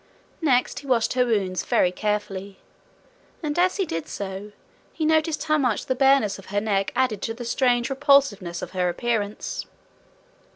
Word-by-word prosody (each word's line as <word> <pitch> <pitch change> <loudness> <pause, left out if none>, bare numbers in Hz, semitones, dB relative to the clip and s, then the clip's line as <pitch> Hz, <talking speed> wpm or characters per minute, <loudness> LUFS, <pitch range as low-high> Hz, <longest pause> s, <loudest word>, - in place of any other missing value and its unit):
Next 260 -6 +2
he 280 - -12
washed 240 -4 +2
her 250 -1 +2
wounds 190 -6 0
very 180 - +2
carefully. 200 -1 -3 0.9
And 300 +2 -1
as 365 +3 +3
he 390 - +1
did 165 - -4
so, 200 +1 -6 0.4
he 315 - -2
noted 315 0 +2
how 310 -1 +2
much 250 -6 0
the 260 - 0
bareness 265 -6 +3
of 195 - -14
her 205 +1 0
neck 200 -2 0
added 245 -6 +1
to 225 - -3
the 240 0 -7
strange 245 -1 +2
repulsiveness 270 - +2
of - - -6
her 180 -1 0
appearance. 215 +1 -2
230 Hz, 165 wpm, -24 LUFS, 200-275 Hz, 0.9 s, as